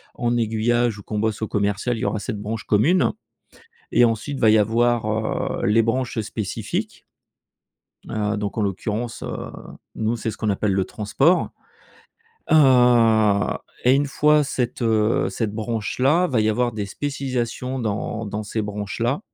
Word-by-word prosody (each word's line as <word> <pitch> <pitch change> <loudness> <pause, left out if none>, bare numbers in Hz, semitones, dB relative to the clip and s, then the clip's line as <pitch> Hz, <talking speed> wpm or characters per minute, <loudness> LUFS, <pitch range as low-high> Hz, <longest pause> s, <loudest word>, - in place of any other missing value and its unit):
en 120 0 0
aiguillage 115 0 +1
ou - - -11
qu'on 105 +1 -3
bosse 110 -1 -1
au - - -1
commercial, 105 +3 -1
il - - -6
y - - -1
aura 105 - -1
cette 100 +1 -5
branche 110 +1 -4
commune 155 - +3 0.8
et 120 - +6
ensuite, 120 +5 -2
va 110 - +5
y 110 - +6
avoir, 110 0 0
heu, - - +1
les 115 +2 +4
branches 120 +1 -1
spécifiques. 110 -2 -4 1.0
Heu, 105 0 -1
donc 105 +1 -4
en 110 - +1
l'occurrence, 110 +4 -3
heu, - - -5 0.4
nous, 110 +1 -1
c'est 115 -1 -3
ce - - -10
qu'on 110 - -1
appelle 100 +1 0
le 95 -1 +1
transport. 135 - +1 1.0
Heu, 160 - +6 1.3
et 125 - +6
une 140 +1 +2
fois 150 +2 +3
cette, 125 -3 -3
heu, 110 -1 +2
cette 110 -3 -2
branche 110 -1 -3
là, 150 +8 +3
va 130 -9 +1
y 110 - +2
avoir 120 +2 +1
des 105 -2 -4
spécialisations 130 0 -3
dans 110 -1 -3
dans 105 +1 -4
ces 110 +1 -3
branches 105 +1 -5
là, 120 - 0
110 Hz, 165 wpm, -22 LUFS, 105-120 Hz, 1.3 s, et